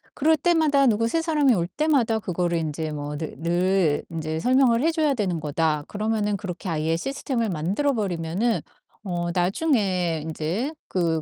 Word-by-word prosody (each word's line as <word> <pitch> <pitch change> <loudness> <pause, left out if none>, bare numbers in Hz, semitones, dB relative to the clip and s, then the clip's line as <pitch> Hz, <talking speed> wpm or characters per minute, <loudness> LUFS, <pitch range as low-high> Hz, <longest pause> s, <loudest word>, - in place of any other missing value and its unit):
'그럴 315 +3 +3
때마다 295 -4 +3
누구 230 0 +2
새 325 +8 0
사람이 300 -6 +3
올 170 -3 0
때마다 255 - +1
그거를 175 -3 -1
인제 155 -1 -3
뭐 145 0 -5
늘 160 0 -5
늘 175 -2 +1
인제 160 -1 -3
설명을 250 +1 +3
해 330 - +3
줘야 310 -3 +1
되는 190 -9 -1
거다.' 150 0 0
그러면은 210 -1 -1
그렇게 185 -2 -6
아예 160 0 0
시스템을 245 0 -2
만들어 190 - 0
버리면은 195 +2 -1 0.4
어 175 -3 -2
나중에 185 - +1
인제 165 - -2 0.2
그 165 -3 0
190 Hz, 330 characters per minute, -24 LUFS, 165-255 Hz, 0.4 s, 그럴